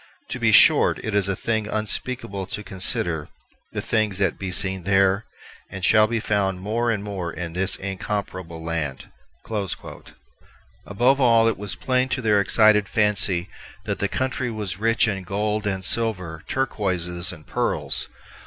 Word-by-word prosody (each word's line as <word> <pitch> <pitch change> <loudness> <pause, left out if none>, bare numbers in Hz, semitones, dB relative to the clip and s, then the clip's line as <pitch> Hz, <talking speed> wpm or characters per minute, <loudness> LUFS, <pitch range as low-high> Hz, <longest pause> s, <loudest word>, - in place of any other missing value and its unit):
To - - -4
bee - - +3
short, - - +6
it 110 - -3
is 100 -1 +2
a 100 - 0
thing 110 0 -1
vnspeakable 105 -2 -3
to 105 - -5
consider 85 -5 -2 0.4
the - - -4
thinges 110 -4 0
that 95 -4 0
bee 95 - -3
seene 95 +1 +2
there, 95 +2 +2 0.4
and 95 -1 -8
shalbe 110 +3 +3
founde 100 -3 0
more 115 +5 -1
and 105 -3 -1
more 95 -5 -4
in 85 -1 -6
this 95 +2 +2
incomperable 95 -4 -5
lande." 75 -5 -3 1.8
Above 125 +7 +2
all, 115 -2 +5
it 115 - +1
was 105 -1 -5
plain 130 0 0
to 130 - -1
their 105 -2 +4
excited 105 0 +4
fancy 105 -5 +1 0.4
that - - -3
the - - +1
country 130 -1 -2
was 105 -4 -4
rich 115 +1 +3
in 100 -3 -2
gold 105 +3 -2
and 95 -2 -2
silver, 95 -9 0
turquoises 90 -8 0
and 75 -4 -12
pearls. - - -1
100 Hz, 155 wpm, -23 LUFS, 95-110 Hz, 1.8 s, short